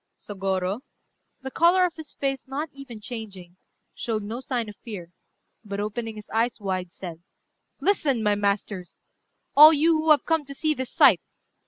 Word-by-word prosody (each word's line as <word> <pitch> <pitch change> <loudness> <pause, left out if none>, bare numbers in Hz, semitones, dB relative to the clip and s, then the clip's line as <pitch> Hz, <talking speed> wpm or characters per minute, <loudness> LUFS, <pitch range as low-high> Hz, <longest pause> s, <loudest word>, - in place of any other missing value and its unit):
Sôgorô, 195 0 -2 0.6
the 265 - -5
colour 355 +4 +4
of 350 - -2
his 315 -3 -10
face 270 -1 -2
not 285 +3 -4
even 275 -5 -10
changing, 205 -6 -8 0.4
showed 220 -3 -3
no 220 +4 -5
sign 250 -5 -2
of 210 - -9
fear, 190 -8 -9 0.5
but 200 -2 -5
opening 220 +2 -4
his 210 -1 -10
eyes 230 +2 0
wide, 185 -3 -3
said 170 -3 -9 0.6
"Listen, 285 - +2
my 210 -1 +3
masters! 200 -2 -2 0.5
all 305 +2 +11
you 320 +2 +3
who 315 +1 -1
have 305 -2 +5
come 325 -2 +1
to 275 0 -8
see 310 +2 +1
this 260 -3 -5
sight. - - +6
230 Hz, 165 wpm, -25 LUFS, 200-285 Hz, 0.6 s, all